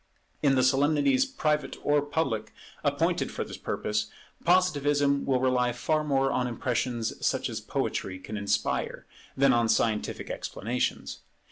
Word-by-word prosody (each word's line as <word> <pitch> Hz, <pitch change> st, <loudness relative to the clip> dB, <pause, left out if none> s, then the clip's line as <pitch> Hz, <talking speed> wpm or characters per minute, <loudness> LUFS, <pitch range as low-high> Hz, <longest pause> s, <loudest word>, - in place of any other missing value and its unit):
In 140 Hz, -2 st, +4 dB
the 130 Hz, -, +3 dB
solemnities, 150 Hz, -, +3 dB
private 150 Hz, -, -1 dB
or 145 Hz, 0 st, +3 dB
public, 145 Hz, -7 st, -2 dB, 0.3 s
appointed -, -, +1 dB
for -, -, -3 dB
this -, -, -8 dB
purpose, 105 Hz, 0 st, -2 dB, 0.4 s
Positivism 145 Hz, -5 st, +2 dB
will 130 Hz, -2 st, +2 dB
rely 125 Hz, -1 st, +2 dB
far 155 Hz, +5 st, 0 dB
more 135 Hz, -2 st, +1 dB
on 125 Hz, -2 st, 0 dB
impressions 120 Hz, -1 st, -2 dB
such -, -, 0 dB
as -, -, -4 dB
poetry 95 Hz, -1 st, -2 dB
can 105 Hz, +3 st, -8 dB
inspire, 105 Hz, -1 st, -1 dB, 0.3 s
than 135 Hz, 0 st, +5 dB
on 120 Hz, -1 st, +2 dB
scientific 110 Hz, -1 st, 0 dB
explanations. 120 Hz, +4 st, -3 dB
135 Hz, 135 wpm, -28 LUFS, 120-145 Hz, 0.4 s, than